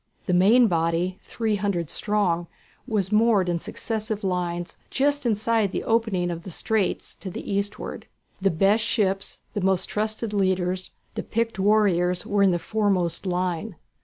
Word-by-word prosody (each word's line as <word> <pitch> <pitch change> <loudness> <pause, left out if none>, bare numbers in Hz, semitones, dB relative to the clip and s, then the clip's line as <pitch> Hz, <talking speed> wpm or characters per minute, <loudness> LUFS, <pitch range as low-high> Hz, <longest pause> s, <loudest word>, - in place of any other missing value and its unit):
The 180 - 0
main 210 +8 +6
body, 170 0 0
three 220 -3 -1
hundred 190 -6 -1
strong, 185 -5 0 0.4
was 205 -5 0
moored 210 -3 +4
in 175 -1 0
successive 215 +2 -4
lines, 175 -2 -2
just 285 -1 +1
inside 220 -2 +1
the - - -2
opening 215 -6 +1
of 170 -1 -5
the 185 - -9
straits 205 +3 -1
to 190 - -6
the 180 - -6
eastward. 200 +1 -3 0.3
The 195 - +4
best 195 +6 +3
ships, 195 -4 -1
the 205 - -2
most 190 -1 +2
trusted 215 +1 -2
leaders, 185 -2 0 0.2
the - - -3
picked 230 -3 -2
warriors 190 -3 +3
were 205 0 +1
in 195 - +6
the 175 - +2
foremost 190 -3 0
line. 180 +2 -1
195 Hz, 155 wpm, -25 LUFS, 180-215 Hz, 0.4 s, main